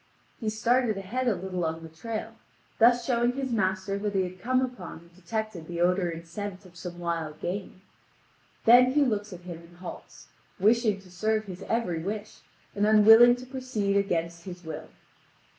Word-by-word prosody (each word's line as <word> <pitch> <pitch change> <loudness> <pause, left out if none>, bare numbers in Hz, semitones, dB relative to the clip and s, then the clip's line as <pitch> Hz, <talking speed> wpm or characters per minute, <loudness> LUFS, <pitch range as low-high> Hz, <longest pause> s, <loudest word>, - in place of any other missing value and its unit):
He 220 - -1
started 230 0 +1
ahead 235 +7 -2
a 230 - +3
little 185 -1 -4
on 160 0 -2
the - - -7
trail, 220 +7 -5 0.5
thus 240 +1 +5
showing 240 -1 +2
his 265 -1 -3
master 190 -2 0
that 205 0 -2
he 190 - +3
had 185 0 -7
come 255 +4 +2
upon 245 -11 -4
and 170 +1 -18
detected 185 -1 -4
the 170 -1 -5
odour 180 +1 +2
and 165 0 -7
scent 195 +2 -6
of 180 -1 -16
some 175 0 -7
wild 165 -3 -3
game. 185 +1 -5 0.8
Then 250 +2 +7
he 295 0 +4
looks 210 -4 -1
at 180 -1 -9
him 175 -2 -8
and 170 +1 -17
halts, 180 - -10 0.3
wishing 215 0 +3
to 185 -2 -17
serve 215 +4 0
his 185 -1 -8
every 200 -8 0
wish, 210 +4 -5 0.4
and 205 +1 +2
unwilling 225 +3 +8
to 250 +1 -10
proceed 255 -6 -2
against 170 -4 -1
his 180 -1 -8
will. 160 -1 -7
200 Hz, 180 wpm, -28 LUFS, 175-230 Hz, 0.8 s, unwilling